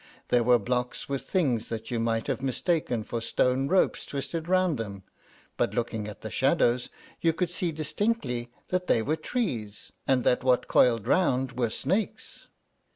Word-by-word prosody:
There 120 - +4
were 125 +1 +5
blocks 125 +3 -2
with 140 -1 -4
things 130 - +1
that 115 0 -5
you 120 - 0
might 115 -1 0
have - - -2
mistaken 135 -3 0
for 115 +2 -4
stone 125 +3 +1
ropes 185 +5 +2
twisted 145 +4 -4
round 185 -6 +2
them; 100 -3 -5 0.5
but, - - 0
looking 115 -3 -2
at 105 - -9
the 110 - -6
shadows, 125 - +2 0.3
you 165 -1 +2
could 175 +1 -1
see 175 -1 -1
distinctly 150 - -1 0.2
that 180 0 -1
they 115 - +3
were 150 +7 +1
trees, 155 - -3 0.2
and 130 -2 +3
that 125 - +2
what 125 -1 +3
coiled 115 -4 +4
round 130 -8 +2
were 120 -2 0
snakes. 195 - -2
125 Hz, 165 wpm, -28 LUFS, 115-165 Hz, 0.5 s, were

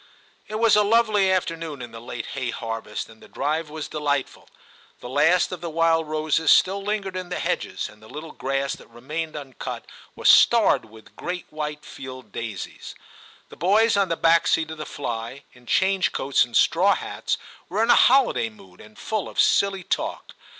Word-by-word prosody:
It 215 - -6
was 225 0 +4
a 210 - +5
lovely 210 -2 +3
afternoon 165 -5 -2
in 120 -2 -8
the 115 - -10
late 120 0 -6
hay 130 -2 -3
harvest, 115 -2 -5
and 110 0 -17
the - - -14
drive 150 +3 -2
was 155 0 -6
delightful. 145 -3 -2 0.5
The - - -8
last 160 +7 +3
of 180 -3 -6
the 170 - -4
wild 165 0 +2
roses 155 0 0
still 195 +2 +5
lingered 200 -2 -3
in 185 -1 -5
the 180 - -3
hedges, - - -2
and 105 0 -17
the 110 - -15
little 155 +1 -8
grass 135 0 -2
that - - -17
remained 155 +8 -5
uncut 140 -4 -7 0.3
was - - -1
starred - - +6
with 110 0 -17
great 180 0 -5
white 150 -1 -5
field 130 -1 -10
daisies. 110 -5 -6 0.5
The - - -13
boys 210 +7 +3
on 200 -2 +2
the 165 - -1
back 165 0 +4
seat 160 -1 +1
of 160 - -8
the 155 - -5
fly, 120 +1 -5
in 125 -1 -20
change 190 +4 +2
coats 135 +1 +2
and 120 - -1
straw - - +4
hats, - - -3 0.3
were 210 +5 +1
in 235 - +4
a - - +7
holiday 250 - +4
mood, 95 -4 -17
and 105 0 -16
full 215 -3 -3
of - - -6
silly 195 -2 +3
talk. - - -3
155 Hz, 190 wpm, -24 LUFS, 130-185 Hz, 0.5 s, a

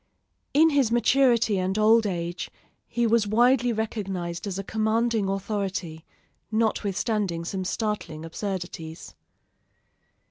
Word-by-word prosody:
In 320 +2 +6
his 275 -6 +2
maturity 240 -4 +3
and 185 +2 -1
old 220 +1 +5
age 175 -2 -3 0.4
he 240 0 0
was 225 -2 +3
widely 245 +3 +3
recognized 195 -5 -3
as 190 -2 -3
a 195 - -3
commanding 220 0 0
authority, 195 -5 -3 0.5
notwithstanding 210 -4 0
some 190 +2 -3
startling 185 -6 -3
absurdities. 170 -2 -6
210 Hz, 105 wpm, -26 LUFS, 185-230 Hz, 0.5 s, In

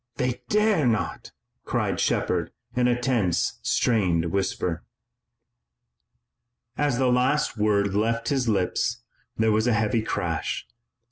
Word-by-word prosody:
They 125 0 -2
dare 210 - +3
not!" 110 -3 -2 0.3
cried - - -1
Shepard 85 -2 0 0.2
in 125 0 +3
a 120 0 +1
tense, 115 -4 0
strained 100 -8 +1
whisper. 90 -3 -1 1.9
As 145 -4 0
the 130 -1 +2
last 130 +4 +1
word 100 -2 +1
left 115 +3 0
his 130 -4 0
lips 110 +4 0 0.3
there 110 0 +3
was 110 +2 +2
a 120 - +3
heavy 110 +1 +1
crash. 90 -7 -2
115 Hz, 120 wpm, -25 LUFS, 100-125 Hz, 1.9 s, dare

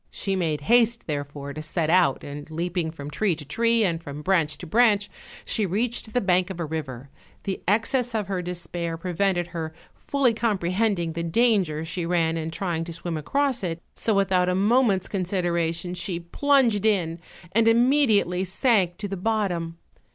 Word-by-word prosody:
She 195 -1 -2
made 160 -5 -1
haste 235 +5 +3
therefore 145 -1 -5
to 155 - -6
set 155 +1 -1
out, 175 -7 +3
and 145 +2 -8
leaping 170 +1 -2
from 145 -2 -8
tree 190 +3 +1
to 150 - -10
tree, 230 +8 +2
and 170 -4 0
from 145 -1 -8
branch 160 -5 +1
to 180 - -9
branch, 205 +2 +3 0.3
she 220 - 0
reached 220 +4 -2
the - - +4
bank 185 -1 +2
of 185 -2 -6
a 170 - -1
river; 140 -4 -6 0.3
the 195 - -3
excess 230 +4 +1
of 215 -2 0
her 190 -2 -2
despair 175 -1 -4
prevented 175 0 0
her 160 -2 -5 0.2
fully 275 -4 +1
comprehending 195 -4 0
the 170 - -3
danger 170 -4 +2
she 175 +2 -3
ran 165 -2 +1
in 160 -1 -3
trying 165 -1 -2
to 170 - -6
swim 170 0 -4
across 260 - 0
it, 170 -2 -2
so 220 - 0
without 185 -2 +2
a 180 - +1
moment's 205 -1 +3
consideration 175 -2 -1
she 180 -1 -2
plunged 235 +3 +2
in, 175 -6 +1 0.3
and 225 +3 +3
immediately 225 -7 +3
sank 190 -2 +1
to 205 - -4
the 195 - -4
bottom. 180 -5 -1
180 Hz, 175 wpm, -25 LUFS, 165-215 Hz, 0.3 s, the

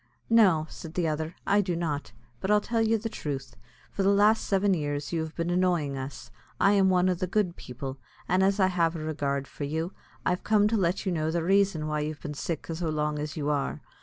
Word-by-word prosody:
"No," 190 -9 +5
said 160 +1 -10
the 175 -2 +1
other, 155 +2 -2
"I 205 +1 +4
do 180 -3 -2
not; 155 -4 -2 0.3
but 190 - -3
I'll 210 0 +5
tell 230 +2 -1
you 225 0 +3
the 225 +1 -4
truth: 135 - -5 0.4
for - - -2
the 195 - +4
last 210 +2 +4
seven 195 0 +2
years 145 -2 -2
you 165 - +1
have 160 0 -6
been 170 +1 -1
annoying 175 -6 +1
us. 130 -1 -7 0.3
I 200 - +5
am 195 -2 +4
one 180 0 +3
o' 185 - +3
the 180 +1 -3
good 185 -2 0
people; 130 +2 -7 0.3
an' 185 +1 +2
as 195 +2 +3
I 190 - +5
have 170 -3 +1
a - - -4
regard 140 -3 -2
for - - -7
you, 160 +5 -2 0.3
I'm 180 - +2
come 210 +1 +3
to 225 - +1
let 185 -2 0
you 190 - +1
know 160 -2 0
the 165 0 0
raison 195 -3 +2
why 150 0 -1
you've 150 0 -4
been 150 -3 -5
sick 155 +2 -4
so 165 0 -3
long 150 -1 -1
as 150 +1 -4
you 150 -1 0
are. 145 -2 -2
170 Hz, 235 wpm, -28 LUFS, 150-195 Hz, 0.4 s, No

